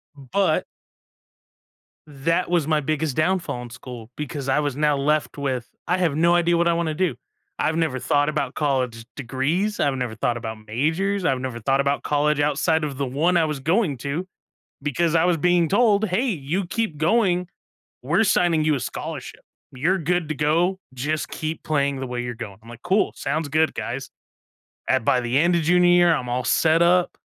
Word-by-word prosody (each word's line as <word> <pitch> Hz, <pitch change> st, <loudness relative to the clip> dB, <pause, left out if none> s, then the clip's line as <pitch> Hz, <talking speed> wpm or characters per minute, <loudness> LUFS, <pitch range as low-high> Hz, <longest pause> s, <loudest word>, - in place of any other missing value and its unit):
But 155 Hz, +5 st, 0 dB, 1.4 s
that 165 Hz, +5 st, -1 dB
was 170 Hz, -4 st, +1 dB
my 155 Hz, -1 st, +2 dB
biggest 150 Hz, -1 st, -1 dB
downfall 165 Hz, -6 st, 0 dB
in 120 Hz, -, -9 dB
school 120 Hz, -1 st, -10 dB
because 145 Hz, -2 st, -4 dB
I 135 Hz, -, +3 dB
was 145 Hz, -3 st, -1 dB
now 150 Hz, 0 st, +2 dB
left 150 Hz, +2 st, 0 dB
with, 130 Hz, -4 st, -3 dB, 0.2 s
I 180 Hz, -, +2 dB
have 165 Hz, -6 st, +1 dB
no 170 Hz, +3 st, +3 dB
idea 175 Hz, 0 st, +3 dB
what 170 Hz, 0 st, +2 dB
I 170 Hz, -, +3 dB
wanna 165 Hz, -2 st, -1 dB
do. 175 Hz, -5 st, 0 dB, 0.4 s
I've 160 Hz, -, +1 dB
never 160 Hz, -6 st, 0 dB
thought 145 Hz, +3 st, +1 dB
about 145 Hz, -3 st, -2 dB
college 130 Hz, -6 st, -1 dB
degrees. 145 Hz, -, -1 dB
I've 140 Hz, -2 st, +1 dB
never 125 Hz, -4 st, -3 dB
thought 120 Hz, +2 st, -1 dB
about 110 Hz, -2 st, -7 dB
majors. 165 Hz, -, -1 dB
I've 130 Hz, -4 st, +1 dB
never 130 Hz, -2 st, -5 dB
thought 135 Hz, +4 st, +1 dB
about 140 Hz, +1 st, +1 dB
college 150 Hz, 0 st, +1 dB
outside 150 Hz, +2 st, +1 dB
of 140 Hz, -3 st, -3 dB
the 140 Hz, -, -1 dB
one 155 Hz, +8 st, +1 dB
I 165 Hz, -, +3 dB
was 150 Hz, -3 st, -3 dB
going 165 Hz, -, +1 dB
to 140 Hz, +9 st, -4 dB, 0.5 s
because 155 Hz, +4 st, 0 dB
I 160 Hz, -, +3 dB
was 175 Hz, -1 st, +3 dB
being 175 Hz, +1 st, +2 dB
told, 210 Hz, +1 st, +3 dB
"Hey, 205 Hz, +8 st, 0 dB
you 180 Hz, -, -2 dB
keep 215 Hz, -3 st, -2 dB
going. 180 Hz, 0 st, +2 dB, 0.5 s
We're 225 Hz, -, +2 dB
signing 175 Hz, -6 st, +2 dB
you 155 Hz, -1 st, +3 dB
a 135 Hz, -, -2 dB
scholarship. -, -, -6 dB, 0.3 s
You're 165 Hz, +9 st, 0 dB
good 175 Hz, 0 st, -1 dB
to -, -, 0 dB
go. 170 Hz, +6 st, +1 dB
Just 150 Hz, +5 st, -2 dB
keep 155 Hz, 0 st, -5 dB
playing 140 Hz, -3 st, 0 dB
the 130 Hz, -, -4 dB
way 120 Hz, 0 st, -3 dB
you're 120 Hz, 0 st, -4 dB
going". 110 Hz, -4 st, -8 dB
I'm 115 Hz, -, -17 dB
like, 120 Hz, +1 st, -11 dB
"Cool. 190 Hz, +4 st, +1 dB
Sounds 155 Hz, -1 st, -2 dB
good, 155 Hz, +2 st, +2 dB
guys". 130 Hz, +2 st, -5 dB, 0.8 s
At 130 Hz, -2 st, +2 dB
by 125 Hz, -, +3 dB
the 120 Hz, +2 st, 0 dB
end 170 Hz, +3 st, +3 dB
of 165 Hz, -, -1 dB
junior 180 Hz, +2 st, +4 dB
year, 175 Hz, -1 st, +5 dB
I'm 125 Hz, -4 st, -4 dB
all 125 Hz, +1 st, -1 dB
set 160 Hz, +1 st, +3 dB
up. 175 Hz, +1 st, +3 dB
150 Hz, 195 wpm, -23 LUFS, 135-175 Hz, 1.4 s, year